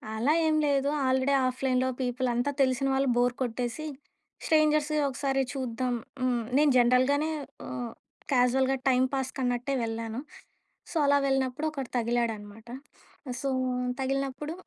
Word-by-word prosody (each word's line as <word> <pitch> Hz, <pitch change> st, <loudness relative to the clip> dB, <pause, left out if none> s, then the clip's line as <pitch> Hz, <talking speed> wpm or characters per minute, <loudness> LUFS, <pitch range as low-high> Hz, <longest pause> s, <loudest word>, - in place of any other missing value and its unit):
అలా 245 Hz, +8 st, +2 dB
ఏం 310 Hz, -, +2 dB
లేదు. 280 Hz, 0 st, +2 dB, 0.2 s
ఆల్రెడీ 260 Hz, +2 st, +2 dB
ఆ‌ఫ్‌లైన్‌లో 255 Hz, 0 st, 0 dB
పీపుల్ 255 Hz, 0 st, -1 dB
అంతా 245 Hz, +4 st, 0 dB
తెలిసిన 260 Hz, 0 st, +2 dB
వాళ్ళు. 270 Hz, +1 st, +1 dB
బోర్ 245 Hz, 0 st, +3 dB
కొట్టేసి, 245 Hz, +4 st, -2 dB, 0.6 s
స్ట్రేంజర్‌స్ 305 Hz, -1 st, +3 dB, 0.2 s
ఒకసారి 270 Hz, 0 st, 0 dB
చూద్దాం 255 Hz, -2 st, -2 dB, 0.3 s
హ్మ్. 245 Hz, -2 st, +1 dB
నేను 295 Hz, 0 st, +5 dB
జనరల్‌గానే 255 Hz, +5 st, +3 dB, 0.4 s
ఆ -, -, -7 dB, 0.6 s
క్యాజువల్‌గా 260 Hz, +1 st, +3 dB
టైమ్‌పాస్ 260 Hz, +1 st, +1 dB
కన్నట్టే 245 Hz, +1 st, -1 dB
వెళ్ళాను. 225 Hz, +1 st, -4 dB, 0.7 s
సో, -, -, -9 dB
అలా 285 Hz, 0 st, +5 dB
వెళ్ళినప్పుడు 270 Hz, +2 st, 0 dB
ఒకడు 275 Hz, -5 st, -5 dB
తగిలాడన్నమాట. 225 Hz, -2 st, -2 dB, 0.7 s
సో, 275 Hz, -, -1 dB, 0.5 s
తగిలినప్పుడు 275 Hz, +3 st, -2 dB
260 Hz, 120 wpm, -28 LUFS, 245-275 Hz, 0.7 s, నేను